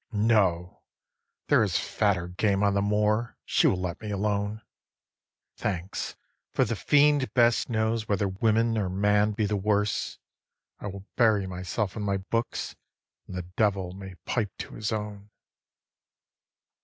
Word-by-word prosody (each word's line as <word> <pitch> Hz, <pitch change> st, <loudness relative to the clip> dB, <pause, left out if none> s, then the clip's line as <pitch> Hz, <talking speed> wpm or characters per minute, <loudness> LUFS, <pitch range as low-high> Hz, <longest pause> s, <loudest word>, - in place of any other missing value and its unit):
No, 100 Hz, -5 st, +2 dB, 0.7 s
there -, -, +5 dB
is -, -, +2 dB
fatter 95 Hz, -5 st, 0 dB
game 100 Hz, +2 st, +1 dB
on 100 Hz, -1 st, +3 dB
the 100 Hz, -, +2 dB
moor; 105 Hz, +3 st, +1 dB
she -, -, +3 dB
will 90 Hz, -, +2 dB
let 90 Hz, +1 st, -4 dB
me 105 Hz, -, -5 dB
alone. 100 Hz, +1 st, -1 dB, 0.9 s
Thanks, 90 Hz, 0 st, -3 dB, 0.4 s
for -, -, +2 dB
the -, -, -2 dB
fiend 145 Hz, -2 st, +3 dB
best 120 Hz, -1 st, +4 dB
knows 110 Hz, -1 st, 0 dB
whether 100 Hz, -1 st, +1 dB
woman 110 Hz, +3 st, +2 dB
or 95 Hz, -3 st, -1 dB
man 105 Hz, +2 st, +2 dB
be 110 Hz, 0 st, 0 dB
the 105 Hz, +1 st, 0 dB
worse. 105 Hz, +1 st, 0 dB, 0.6 s
I -, -, -5 dB
will 100 Hz, 0 st, -7 dB
bury 110 Hz, -5 st, +4 dB
myself 95 Hz, +2 st, -3 dB
in 110 Hz, -, -4 dB
my 100 Hz, -1 st, 0 dB
books, 115 Hz, +5 st, -3 dB, 0.5 s
and -, -, -7 dB
the 90 Hz, -, -3 dB
Devil 100 Hz, -4 st, +1 dB
may 95 Hz, -1 st, -9 dB
pipe 105 Hz, -6 st, -2 dB
to -, -, -7 dB
his 110 Hz, 0 st, -3 dB
own. 105 Hz, -1 st, -5 dB
105 Hz, 145 wpm, -27 LUFS, 95-110 Hz, 0.9 s, there